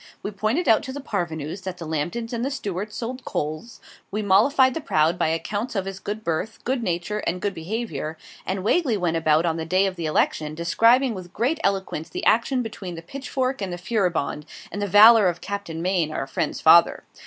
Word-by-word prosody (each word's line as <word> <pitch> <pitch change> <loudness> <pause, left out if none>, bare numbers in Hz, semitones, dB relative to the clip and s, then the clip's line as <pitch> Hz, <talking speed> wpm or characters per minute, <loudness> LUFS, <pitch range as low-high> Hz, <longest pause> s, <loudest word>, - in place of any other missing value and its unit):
We 205 - -3
pointed 215 - -1
out 220 - +5
to 260 - -5
the 285 - -6
parvenus 175 - -4
that 185 -1 -6
the 170 - -7
Lambtons 175 +10 -3
and 235 0 -2
the 270 - 0
Stuarts 210 -6 -4
sold 250 +2 -5
coals: 155 +10 -4 0.3
we 210 +2 -3
mollified 260 +7 +4
the 325 - -4
proud 160 - +1
by - - +2
accounts 205 +9 -2
of 195 -2 -1
his 195 0 -6
good 210 +2 -5
birth, 170 +6 -2
good 255 0 -1
nature, 180 +1 -2
and 180 +2 -1
good 200 +1 -2
behaviour; 165 -4 -4 0.3
and 190 0 -3
Wagley 245 - +2
went 175 -3 0
about 155 0 +3
on 165 -1 0
the 160 - -3
day 185 +4 +2
of 185 -2 -3
election, 155 -1 0
describing 230 +10 +3
with 185 -3 -9
great 255 +9 0
eloquence, 190 -5 -1
the - - -5
action 245 +3 +3
between 195 -5 -7
the 165 - -9
'Pitchfork' 265 +3 -3
and 190 -2 -3
the 175 - -4
'Furibonde,' 175 -6 -1 0.2
and 205 - -4
the 205 - 0
valour 210 +1 +8
of 170 -1 -4
Captain 200 -5 -5
Maine, 180 -4 +1
our 135 - -3
friend's 135 - -3
father. - - +6
195 Hz, 205 wpm, -24 LUFS, 165-230 Hz, 0.3 s, valour